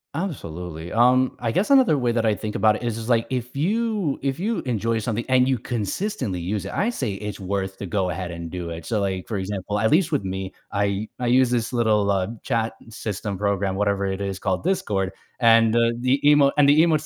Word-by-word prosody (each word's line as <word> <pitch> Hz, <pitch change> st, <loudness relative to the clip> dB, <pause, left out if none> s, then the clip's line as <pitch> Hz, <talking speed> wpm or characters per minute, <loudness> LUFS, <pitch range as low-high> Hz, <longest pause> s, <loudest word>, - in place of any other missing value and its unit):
Absolutely, 90 Hz, -, -5 dB
um, 125 Hz, +2 st, +4 dB
I 115 Hz, -2 st, -1 dB
guess 205 Hz, -, 0 dB
another 255 Hz, -, +5 dB
way 120 Hz, -2 st, +1 dB
that 115 Hz, -1 st, 0 dB
I 110 Hz, -2 st, +2 dB
think 105 Hz, +2 st, -5 dB
about 110 Hz, -1 st, +3 dB
it -, -, -7 dB
is 115 Hz, -1 st, -2 dB
is 115 Hz, +2 st, -6 dB
like, 115 Hz, -1 st, +3 dB
if 125 Hz, 0 st, -3 dB
you 205 Hz, -1 st, 0 dB
if 135 Hz, +1 st, -2 dB
you 215 Hz, +5 st, -1 dB
enjoy 115 Hz, -2 st, -1 dB
something 115 Hz, +1 st, -2 dB
and 130 Hz, 0 st, +3 dB
you 130 Hz, -, +2 dB
consistently 120 Hz, -, -3 dB
use 95 Hz, +4 st, -3 dB
it, -, -, -5 dB
I 220 Hz, +4 st, 0 dB
say 125 Hz, -, -2 dB
it's 105 Hz, +1 st, -6 dB
worth 95 Hz, 0 st, -3 dB
to 100 Hz, -, -6 dB
go 95 Hz, -2 st, 0 dB
ahead 90 Hz, +1 st, -4 dB
and 85 Hz, -1 st, -7 dB
do 90 Hz, -2 st, -5 dB
it. 85 Hz, 0 st, -7 dB
So, 110 Hz, -3 st, -1 dB
like, 95 Hz, -2 st, -2 dB
for 110 Hz, -, -3 dB
example, 100 Hz, +1 st, -3 dB
at 110 Hz, +1 st, +2 dB
least 165 Hz, +1 st, +3 dB
with 140 Hz, -10 st, 0 dB
me, 95 Hz, 0 st, -4 dB, 0.2 s
I 100 Hz, +1 st, -1 dB
I 125 Hz, -, -2 dB
use 125 Hz, +1 st, +4 dB
this 120 Hz, 0 st, -1 dB
little, 105 Hz, -4 st, +2 dB
uh, 95 Hz, -2 st, +1 dB, 0.2 s
chat 115 Hz, -3 st, -1 dB, 0.2 s
system 105 Hz, -3 st, -4 dB
program, 100 Hz, -1 st, 0 dB
whatever 100 Hz, 0 st, 0 dB
it 95 Hz, 0 st, -2 dB
is, 100 Hz, -1 st, -3 dB
called 95 Hz, -1 st, -2 dB
Discord, 100 Hz, -, -1 dB, 0.3 s
and, 115 Hz, -2 st, +5 dB
the 115 Hz, 0 st, +3 dB
the 130 Hz, +3 st, +1 dB
emote 145 Hz, -1 st, +6 dB
and 140 Hz, -, +6 dB
the 145 Hz, +2 st, +5 dB
emotes 155 Hz, -3 st, +2 dB
110 Hz, 225 wpm, -23 LUFS, 100-130 Hz, 0.3 s, emote